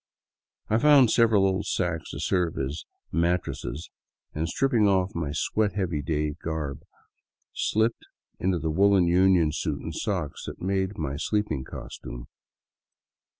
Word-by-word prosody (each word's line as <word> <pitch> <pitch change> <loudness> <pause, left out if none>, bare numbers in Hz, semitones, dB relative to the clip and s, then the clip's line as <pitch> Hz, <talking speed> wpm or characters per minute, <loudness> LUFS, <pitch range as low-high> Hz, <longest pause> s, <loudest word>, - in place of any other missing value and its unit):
I 110 - +2
found 140 -3 +6
several 110 -4 +4
old 95 +1 0
sacks 85 -3 -1
to - - -6
serve 90 -4 0
as 70 +4 -3
" - - -49
mat 85 +2 +2
tress - - -6 0.5
" - - -52
and, 80 +2 -2
stripping 120 -2 +2
off 95 0 +2
my 80 -4 -2
sweat 100 +7 0
heavy 90 -7 -1
day 75 +1 -1
garb, 75 -4 -4 0.7
slipped 110 +2 0 0.3
into 95 -1 +1
the 80 -1 -2
woolen 100 +2 +4
union 90 -2 +4
suit 75 -2 -2
and 80 - -6
socks 90 -5 -3
that - - -7
made 95 +1 -1
up - - -18
my 70 -3 -3
sleeping 80 -4 -1
costume. - - -8
90 Hz, 150 wpm, -26 LUFS, 80-100 Hz, 0.7 s, found